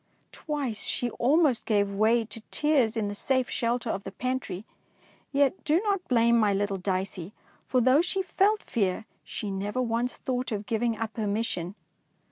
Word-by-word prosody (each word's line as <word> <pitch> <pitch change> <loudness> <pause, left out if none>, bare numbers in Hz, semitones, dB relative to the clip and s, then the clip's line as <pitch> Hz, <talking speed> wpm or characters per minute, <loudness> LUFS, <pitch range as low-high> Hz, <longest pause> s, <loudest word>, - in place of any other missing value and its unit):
Twice 280 -8 -3
she 245 -1 -1
almost 275 0 +2
gave 200 -2 +2
way 220 +3 +3
to 220 +1 -7
tears 270 -7 +2
in 215 -2 0
the 205 - -3
safe 260 +4 0
shelter 235 0 0
of 195 - -4
the 195 - -6
pantry; 240 -5 -3 0.7
yet 280 +4 +2
do 310 +3 +3
not 400 -4 -1
blame 235 -1 +4
my 205 -3 +3
little 200 0 0
Dicey, 185 0 -3 0.3
for 255 - +2
though 260 +5 +5
she 380 +2 -1
felt 405 +4 +2
fear, 200 -1 -1 0.2
she 210 -3 -5
never 200 +5 -2
once 240 0 -1
thought 255 -1 -2
of 210 -1 -3
giving 230 0 0
up 225 -1 -4
her 215 -2 -1
mission. 200 -4 -2
230 Hz, 170 wpm, -27 LUFS, 205-260 Hz, 0.7 s, though